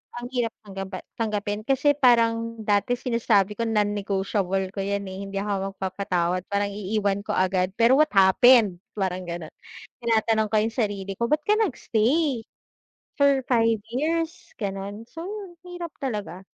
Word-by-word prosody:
ang 245 Hz, +1 st, -6 dB
hirap 240 Hz, -3 st, -1 dB
tanggapa 195 Hz, -2 st, -7 dB, 0.2 s
tanggapin 210 Hz, 0 st, -2 dB
kasi 275 Hz, +2 st, +3 dB
parang 230 Hz, -2 st, +3 dB
dati 205 Hz, +4 st, +2 dB
sinasabi 225 Hz, -4 st, +1 dB
ko 230 Hz, -, 0 dB
non-negotiable 200 Hz, -2 st, 0 dB
ko 200 Hz, -, -7 dB
'yan, 200 Hz, +1 st, -1 dB
eh, 190 Hz, 0 st, -7 dB
hindi 195 Hz, -, -8 dB
ako 195 Hz, -1 st, -2 dB
magpapatawad 185 Hz, -2 st, -1 dB
parang 200 Hz, 0 st, -1 dB
iiwan 200 Hz, 0 st, -1 dB
ko -, -, -1 dB
agad 185 Hz, +1 st, +1 dB
pero 240 Hz, +5 st, +5 dB
what 310 Hz, -, +6 dB
happened, 195 Hz, 0 st, +6 dB, 0.2 s
parang 185 Hz, -2 st, -2 dB
gano'n. 170 Hz, -2 st, -6 dB, 0.5 s
Tinatanong 220 Hz, -1 st, +2 dB
ko 215 Hz, -, +3 dB
yung 220 Hz, +1 st, 0 dB
sarili 200 Hz, -4 st, -2 dB
ko 235 Hz, +5 st, -2 dB
ba't 300 Hz, -, +4 dB
ka 420 Hz, -, +4 dB
nag-stay, 275 Hz, -, +1 dB, 0.7 s
for 280 Hz, -1 st, +4 dB
5 230 Hz, -3 st, +3 dB, 0.2 s
years 330 Hz, +4 st, -2 dB
gano'n, 200 Hz, +2 st, -5 dB
so 330 Hz, +1 st, -8 dB
ang 390 Hz, -2 st, -7 dB
hirap 350 Hz, -2 st, -7 dB
talaga. 205 Hz, -6 st, -4 dB
210 Hz, 150 wpm, -25 LUFS, 195-245 Hz, 0.7 s, what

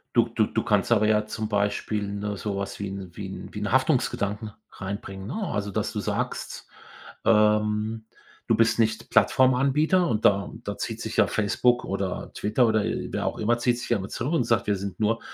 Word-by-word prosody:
Du -, -, +5 dB
du -, -, +1 dB
du -, -, -1 dB
kannst -, -, +1 dB
aber 110 Hz, -2 st, +4 dB
ja 105 Hz, 0 st, +2 dB
zum 110 Hz, 0 st, -4 dB
Beispiel, 105 Hz, +1 st, 0 dB
ne, 100 Hz, 0 st, -3 dB
so 100 Hz, 0 st, -3 dB
was 100 Hz, 0 st, -4 dB
wie 100 Hz, -, -3 dB
'n 95 Hz, -2 st, -7 dB
wie 100 Hz, -, -5 dB
'n 95 Hz, -, -8 dB
wie 105 Hz, -, -5 dB
'n 105 Hz, -1 st, -2 dB
Haftungsgedanken 115 Hz, -6 st, +1 dB, 0.2 s
reinbringen, 95 Hz, 0 st, -6 dB
ne? 130 Hz, -, -5 dB, 0.2 s
Also, 105 Hz, 0 st, -2 dB
dass 100 Hz, -, -2 dB
du -, -, -2 dB
sagst, -, -, -3 dB, 0.6 s
ähm, 105 Hz, 0 st, +2 dB, 0.4 s
du 115 Hz, -, +4 dB
bist 115 Hz, +1 st, +3 dB
nicht 110 Hz, -1 st, 0 dB
Plattformanbieter 140 Hz, +7 st, +3 dB
und 110 Hz, -7 st, -1 dB
da 100 Hz, -1 st, +3 dB
da -, -, -4 dB
zieht -, -, -4 dB
sich -, -, -5 dB
ja -, -, +5 dB
Facebook 120 Hz, +4 st, +1 dB
oder 95 Hz, -1 st, -3 dB
Twitter 110 Hz, +4 st, +2 dB
oder 110 Hz, -1 st, +2 dB
wer -, -, -2 dB
auch -, -, -2 dB
immer 120 Hz, +2 st, +1 dB
zieht 120 Hz, 0 st, +1 dB
sich 120 Hz, -, -6 dB
ja 120 Hz, -, +3 dB
immer 95 Hz, 0 st, -6 dB
zurück 130 Hz, +7 st, -3 dB
und 160 Hz, -8 st, +2 dB
sagt: 115 Hz, -2 st, +1 dB
„Wir 105 Hz, -, +1 dB
sind 95 Hz, -2 st, -6 dB
nur 110 Hz, +1 st, +1 dB
105 Hz, 205 wpm, -26 LUFS, 100-115 Hz, 0.6 s, Du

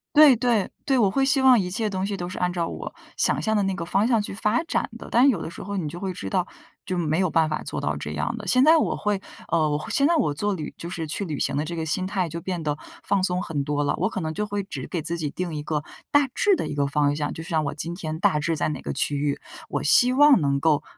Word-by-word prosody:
对 295 Hz, -4 st, +8 dB
对 230 Hz, -4 st, +1 dB, 0.2 s
对， 270 Hz, -2 st, +2 dB
我 205 Hz, -5 st, +3 dB
会 270 Hz, +4 st, +1 dB
希 270 Hz, 0 st, +3 dB
望 255 Hz, -3 st, +6 dB
一 180 Hz, -2 st, -2 dB
切 215 Hz, +3 st, -1 dB
东 190 Hz, -1 st, -3 dB
西 200 Hz, -1 st, -3 dB
都 175 Hz, -, -4 dB
是 180 Hz, -, -6 dB
按 180 Hz, 0 st, +1 dB
照 170 Hz, -2 st, -1 dB
我 -, -, -7 dB, 0.2 s
想 -, -, +2 dB
象 220 Hz, 0 st, 0 dB
的 205 Hz, -, +3 dB
那 195 Hz, -1 st, -1 dB
个 170 Hz, -3 st, -4 dB
方 195 Hz, +5 st, +1 dB
向 235 Hz, -3 st, +3 dB
去 205 Hz, -, -5 dB
发 215 Hz, +6 st, 0 dB
展 335 Hz, -, -1 dB
的， -, -, -10 dB
但 255 Hz, +4 st, +5 dB
有 200 Hz, -10 st, 0 dB
的 -, -, -5 dB
时 -, -, -9 dB
候 200 Hz, 0 st, -4 dB
你 165 Hz, -5 st, -2 dB
就 170 Hz, +4 st, -7 dB
会 190 Hz, 0 st, -3 dB
知 100 Hz, -, -7 dB
道 180 Hz, -, 0 dB, 0.4 s
就 185 Hz, -3 st, -2 dB
没 160 Hz, 0 st, 0 dB
有 185 Hz, -3 st, +2 dB
办 160 Hz, -1 st, +2 dB
法 155 Hz, -, -2 dB
做 -, -, -5 dB
到 -, -, -1 dB
这 -, -, -5 dB
样 -, -, -2 dB
的。 -, -, -8 dB
现 255 Hz, 0 st, +5 dB
在 320 Hz, +3 st, +7 dB
我 -, -, +1 dB
会， 205 Hz, -2 st, -1 dB, 0.3 s
呃， 160 Hz, -2 st, +2 dB
我 150 Hz, +1 st, -2 dB
现 280 Hz, -, +3 dB
在 340 Hz, -, +3 dB
我 195 Hz, -, +1 dB
做 205 Hz, +7 st, -1 dB
旅 155 Hz, -4 st, -6 dB
就 170 Hz, -, -7 dB
是 165 Hz, -2 st, -4 dB
去 155 Hz, +6 st, -3 dB
旅 155 Hz, -6 st, -4 dB
行 140 Hz, -, 0 dB
的 150 Hz, +2 st, -1 dB
这 170 Hz, +2 st, -5 dB
个 160 Hz, -, -3 dB
心 185 Hz, +4 st, -1 dB
态 190 Hz, -2 st, -1 dB
就 170 Hz, +2 st, -6 dB
变 180 Hz, -2 st, -4 dB
得 150 Hz, -1 st, -1 dB, 0.3 s
放 200 Hz, -, +1 dB
松 180 Hz, -1 st, 0 dB
很 145 Hz, -4 st, -2 dB
多 145 Hz, +1 st, -1 dB
了， -, -, +1 dB
我 185 Hz, +6 st, 0 dB
可 205 Hz, -, -4 dB
能 160 Hz, -1 st, -3 dB
就 210 Hz, +3 st, -2 dB
会 205 Hz, 0 st, -2 dB
只 195 Hz, -, -7 dB
给 170 Hz, -4 st, -3 dB
自 170 Hz, +2 st, -1 dB
己 150 Hz, -2 st, -2 dB
定 180 Hz, 0 st, -4 dB
一 150 Hz, -, -3 dB
个 150 Hz, 0 st, -2 dB, 0.3 s
大 290 Hz, -1 st, +4 dB
致 400 Hz, -1 st, +3 dB
的 -, -, -3 dB
一 -, -, -4 dB
个 140 Hz, -1 st, 0 dB
方 145 Hz, 0 st, +1 dB
向。 145 Hz, 0 st, -2 dB
就 160 Hz, -, -7 dB
像 160 Hz, -2 st, -1 dB
我 140 Hz, -, -2 dB
今 165 Hz, +3 st, -4 dB
天 160 Hz, -3 st, -5 dB
大 150 Hz, -, +2 dB
致 165 Hz, +2 st, -1 dB
在 -, -, 0 dB
哪 150 Hz, -, -5 dB
个 -, -, -4 dB
区 145 Hz, -, 0 dB
域， 140 Hz, 0 st, -1 dB, 0.3 s
我 145 Hz, -1 st, -2 dB
希 245 Hz, -, +6 dB
望 285 Hz, -2 st, +6 dB
能 140 Hz, -1 st, +1 dB
够， 150 Hz, 0 st, +2 dB
180 Hz, 320 characters per minute, -24 LUFS, 155-210 Hz, 0.4 s, 对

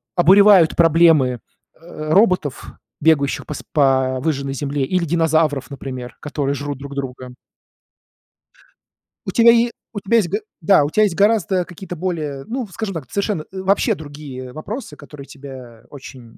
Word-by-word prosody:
обуревают 190 Hz, -1 st, +6 dB
проблемы, 160 Hz, -7 st, +4 dB, 0.4 s
э-э, 155 Hz, -2 st, -8 dB
роботов, 185 Hz, -, +2 dB, 0.4 s
бегающих 145 Hz, -4 st, +2 dB
по 150 Hz, -, -5 dB
с -, -, -8 dB
по 130 Hz, -3 st, +2 dB
выжженной 140 Hz, -3 st, -2 dB
земле, 140 Hz, +1 st, -2 dB
или 180 Hz, +5 st, 0 dB
динозавров, 160 Hz, -3 st, +1 dB
например, 130 Hz, -3 st, -7 dB
которые 140 Hz, -1 st, -2 dB
жрут 145 Hz, -1 st, -5 dB
друг 140 Hz, 0 st, -9 dB
друга. 130 Hz, -2 st, -6 dB, 1.9 s
У -, -, -2 dB
тебя 235 Hz, -1 st, +6 dB
е 235 Hz, 0 st, +2 dB, 0.2 s
у 205 Hz, -, -4 dB
тебя 205 Hz, +4 st, +1 dB
есть 195 Hz, -6 st, +1 dB
г 205 Hz, +5 st, -1 dB, 0.2 s
да, 165 Hz, -3 st, +4 dB
у 145 Hz, -, -1 dB
тя 215 Hz, -, +2 dB
есть 200 Hz, -6 st, +2 dB
гораздо 200 Hz, -3 st, +2 dB
какие-то 180 Hz, +1 st, -9 dB
более, 155 Hz, -6 st, -4 dB
ну, 255 Hz, +2 st, -4 dB
в 190 Hz, -, -18 dB
скажем 215 Hz, -2 st, -4 dB
так, 155 Hz, -6 st, -7 dB
совершенно 200 Hz, -5 st, -2 dB
э, 190 Hz, -, -7 dB
вообще 200 Hz, +4 st, +1 dB
другие 145 Hz, -5 st, -9 dB
вопросы, 200 Hz, -, -7 dB
которые 145 Hz, -1 st, -12 dB
тебя 130 Hz, -5 st, -12 dB
очень 130 Hz, -5 st, -13 dB
155 Hz, 160 wpm, -19 LUFS, 140-190 Hz, 1.9 s, обуревают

